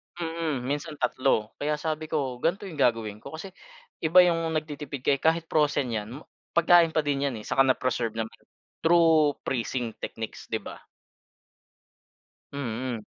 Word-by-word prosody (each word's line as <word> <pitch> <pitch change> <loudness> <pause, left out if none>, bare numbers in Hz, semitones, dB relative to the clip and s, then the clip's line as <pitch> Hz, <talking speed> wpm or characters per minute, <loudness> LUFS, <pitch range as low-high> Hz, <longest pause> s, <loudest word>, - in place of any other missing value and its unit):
Mm. 165 -5 -2
Minsan 145 +2 -3
tatlo. 125 -4 +1
Kaya 150 +1 0
sabi 155 +1 -3
ko 135 -5 -2
ganito 170 +9 0
'yong 165 -6 -8
gagawin 115 -5 +1
ko 140 +7 -9
kasi 190 +4 -8 0.5
iba 165 +3 +5
'yong 165 -2 +1
nagtitipid 145 -3 -4
ka, - - +3
eh, 140 - -1
kahit 165 +1 +2
frozen 145 -4 +2
'yan 105 -2 -3 0.5
pagkain 170 0 +6
pa 155 - +3
din 140 -1 0
'yan, 135 - -3
eh, 105 - -9
saka 135 - +2
na-preserve 130 -4 +1
naman, 110 0 -3 0.5
through 160 -3 +4
freezing 120 -2 -2
techniques, 110 -1 -6
'di - - 0
ba? - - -9 1.7
Mm. 125 -3 -3
145 Hz, 150 wpm, -27 LUFS, 125-160 Hz, 1.7 s, pagkain